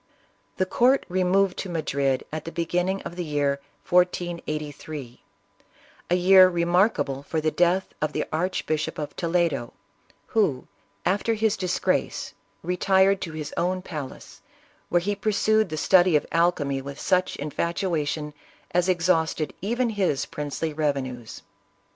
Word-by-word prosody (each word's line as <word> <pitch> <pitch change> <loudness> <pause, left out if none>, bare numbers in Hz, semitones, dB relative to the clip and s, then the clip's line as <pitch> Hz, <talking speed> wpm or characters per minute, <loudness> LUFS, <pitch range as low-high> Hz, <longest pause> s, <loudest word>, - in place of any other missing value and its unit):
The 185 - +2
court 250 +8 +3
removed 185 +1 +2
to 190 - -4
Madrid 140 -5 -1
at 155 -1 -4
the 165 - -5
beginning 180 +3 -1
of 175 - -7
the 180 - -2
year 145 -3 0 0.3
1483 155 -7 -1 0.4
— - - -30
a 175 - +3
year 185 +1 +7
remarkable 175 -5 +1
for 160 +3 -2
the 155 0 0
death 180 +3 +2
of 155 0 0
the - - -2
Archbishop 160 -2 -1
of 150 - -5
Toledo, 165 -8 0 0.6
who, 190 - +1 0.4
after 205 +5 +1
his 220 0 +1
disgrace, 185 -3 -1 0.3
retired 190 +2 +3
to 165 - -5
his 155 -2 -6
own 185 +1 -1
palace, 150 -8 -8 0.5
where 175 - +3
he 205 +3 -1
pursued 215 0 +2
the 155 - -4
study 180 +1 +4
of 150 - +2
al 170 +1 +4
chemy 140 -5 -3
with 140 +1 -8
such 185 0 +1
infatuation 155 -1 -2 0.4
as 180 +1 +2
exhausted 165 -4 +1
even 235 +4 0
his 190 -10 0
princely 150 +2 -4
revenues. 135 -6 -3
170 Hz, 135 wpm, -25 LUFS, 150-185 Hz, 0.6 s, year